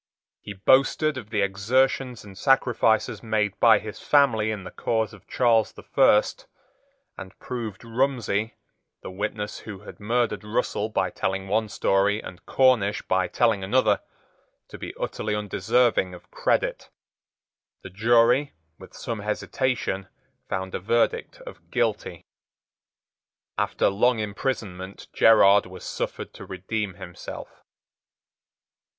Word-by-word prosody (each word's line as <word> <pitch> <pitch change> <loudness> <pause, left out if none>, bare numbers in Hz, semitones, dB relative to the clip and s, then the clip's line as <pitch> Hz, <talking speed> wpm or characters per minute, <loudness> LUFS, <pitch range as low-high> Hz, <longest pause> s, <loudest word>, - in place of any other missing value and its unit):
He 105 - -7
boasted 135 +8 +3
of 115 -5 -8
the 105 -2 0
exertions 125 +6 0
and 100 -2 -12
sacrifices 120 -2 +2
made 110 -3 -1
by 115 -2 +7
his 105 0 -7
family 120 -7 +3
in 105 -3 -4
the - - -9
cause 110 -2 -1
of 105 - -16
Charles 115 -3 +2
the - - -13
First, - - +2 0.7
and 95 0 -10
proved 115 -6 -6
Rumsey, 115 -3 -1 0.5
the - - -7
witness 105 +2 -4
who 105 -3 -9
had 105 - -12
murdered 115 +2 0
Russell 105 0 -1
by 95 -3 -1
telling 95 0 -2
one 110 +2 0
story 100 +1 +1
and 90 - -10
Cornish 120 -6 +3
by 95 -1 +1
telling 110 -1 +1
another, 105 0 +2 0.7
to - - -10
be - - -7
utterly 105 -1 -2
undeserving 105 -1 +1
of 90 - -17
credit. - - -1 0.9
The 95 - -9
jury, 120 +7 +3 0.3
with - - -14
some 115 -2 -5
hesitation, 105 -1 -2 0.4
found 95 0 -3
a - - -2
verdict 115 +5 0
of - - -12
Guilty. - - -2 1.3
After - - +1
long 115 +5 +2
imprisonment 100 -3 -4
Gerard 100 -3 +6
was 90 0 -11
suffered - - -5
to - - -10
redeem 95 +1 -4
himself. 90 0 -10
105 Hz, 125 wpm, -25 LUFS, 100-120 Hz, 1.3 s, by